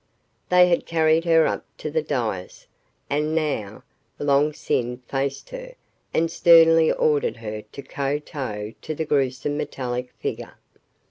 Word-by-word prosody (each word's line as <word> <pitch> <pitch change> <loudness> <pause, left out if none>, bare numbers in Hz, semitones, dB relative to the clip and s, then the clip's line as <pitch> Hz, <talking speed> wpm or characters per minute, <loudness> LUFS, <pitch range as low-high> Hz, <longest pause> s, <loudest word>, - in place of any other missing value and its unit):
They 180 0 +6
had 170 -1 +1
carried 160 0 +2
her 165 -2 +5
up - - -1
to 155 - -5
the 160 +1 +1
dais, 115 -11 -3 0.4
and 150 +2 -1
now 145 -11 -2 0.3
Long 145 +1 +2
Sin 125 -4 -2
faced 135 - -3
her - - -8 0.4
and 165 +1 +1
sternly 165 -1 +6
ordered 150 -5 +1
her 110 -1 -6
to 140 - -9
kowtow 135 -7 -4
to 155 - -5
the 160 - -2
gruesome 140 0 0
metallic 125 -4 -4
figure. - - -5
145 Hz, 135 wpm, -23 LUFS, 130-160 Hz, 0.4 s, They